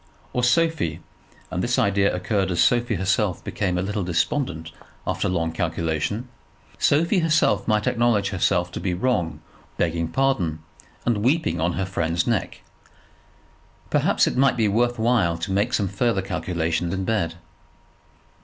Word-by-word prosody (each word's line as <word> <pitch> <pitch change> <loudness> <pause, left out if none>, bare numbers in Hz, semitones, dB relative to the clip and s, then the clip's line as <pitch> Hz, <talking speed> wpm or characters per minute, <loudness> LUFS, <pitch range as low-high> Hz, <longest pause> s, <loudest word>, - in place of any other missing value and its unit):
Or 125 - 0
Sophie, 120 - +1 0.5
and 90 - -2
this 120 +4 0
idea 100 -5 +2
occurred 95 +1 -1
as 85 - -1
Sophie 120 -2 +3
herself 95 +1 0
became 90 -4 -2
a 90 - 0
little 105 +1 -2
despondent 85 - -1 0.3
after - - -1
long 80 -3 0
calculation, 85 - -2 0.5
Sophie 170 +7 +3
herself 155 -4 +2
might 105 -1 +2
acknowledge 120 -5 +2
herself 90 -2 +1
to - - -5
be 90 -2 -1
wrong, 85 -8 -1 0.4
begging 85 -1 0
pardon, 90 - 0 0.4
and 120 -2 +2
weeping 130 - +1
on 85 +1 +1
her 95 - -1
friend's 85 -2 -1
neck. - - -1 1.3
Perhaps - - +3
it - - -1
might 135 0 +3
be 110 -2 +3
worth 120 +4 +1
while 110 -8 +2
to 85 +4 -4
make 100 +2 +1
some 100 - +1
further 95 +1 0
calculation 85 -2 -2
in 95 0 -2
bed. 95 -7 0
100 Hz, 145 wpm, -23 LUFS, 85-120 Hz, 1.3 s, Sophie